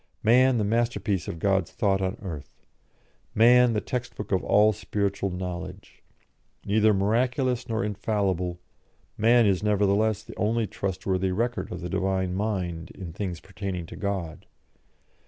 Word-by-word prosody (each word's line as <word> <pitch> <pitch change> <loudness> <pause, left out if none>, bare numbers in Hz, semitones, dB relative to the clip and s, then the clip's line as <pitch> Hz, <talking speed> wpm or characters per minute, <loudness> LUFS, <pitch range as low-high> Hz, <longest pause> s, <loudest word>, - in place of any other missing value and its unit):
Man, 125 +3 +5
the 110 - +1
masterpiece 110 -4 0
of - - -4
God's 95 0 +1
thought 100 -3 +1
on 95 0 -2
earth. 80 -7 -8 0.7
Man, 120 +2 +6
the 105 - 0
text 125 -1 -4
book 105 - -7
of 95 - +1
all 105 +1 +4
spiritual 100 -1 -2
knowledge. 90 +1 -7 0.6
Neither 110 +1 +4
miraculous 125 +5 0
nor 115 +1 0
infallible, 95 -4 -1 0.6
man 115 +2 +4
is 95 -3 +2
nevertheless 105 +1 +2
the 115 -1 -11
only 110 +2 +1
trustworthy 95 -1 -2
record 120 +5 -2
of 90 - -5
the 90 - -4
Divine 95 0 0
mind 90 -5 -2
in 85 -4 -8
things 90 -2 -4
pertaining 95 -3 -5
to - - -10
God. 95 -6 -4
100 Hz, 140 wpm, -26 LUFS, 95-110 Hz, 0.7 s, Man